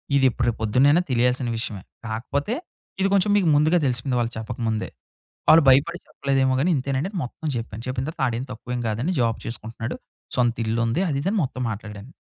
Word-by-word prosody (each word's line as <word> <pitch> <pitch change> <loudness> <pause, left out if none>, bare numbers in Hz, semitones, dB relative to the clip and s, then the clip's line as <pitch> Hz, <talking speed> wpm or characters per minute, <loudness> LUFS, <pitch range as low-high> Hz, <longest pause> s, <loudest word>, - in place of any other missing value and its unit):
ఇదెప్పుడు 130 -3 +3
రేపు 120 - 0
పొద్దునైనా 135 +10 +4
తెలియాల్సిన 125 +1 +2
విషయమే. 105 -4 -4 0.3
కాకపోతే 135 - -2 0.5
ఇది 195 - +4
కొంచెం 200 +1 +3
మీకు 185 - +2
ముందుగా 155 +4 +4
దెలిసిపోయింది 125 0 0
వాళ్ళు 120 0 0
చెప్పకముందే. 110 0 -2 0.6
వాళ్ళు 160 -1 +8
భయపడి 165 +7 +4
చెప్పలేదేమో 135 -1 +1
గాని 170 +6 +2
ఇంతేనండి 135 +5 -1
మొత్తం 140 +5 -6
జెప్పాను. 115 -1 -5
చెప్పిన 130 0 -2
తరువాత 160 - -6
ఆడేం 120 +1 -2
తక్కువేమి 125 +1 -4
గాదని 115 +11 -1
జాబ్ 115 -2 +1
చేసుకుంటున్నాడు. 115 0 -5 0.4
సొంత 120 -2 +2
ఇల్లు 110 +1 0
ఉంది. 120 +11 0
అది 140 - 0
ఇది 175 - -2
అని 220 - 0
మొత్తం 130 -1 -4
మాట్లాడాను. 105 +2 -8
125 Hz, 170 wpm, -24 LUFS, 115-140 Hz, 0.6 s, వాళ్ళు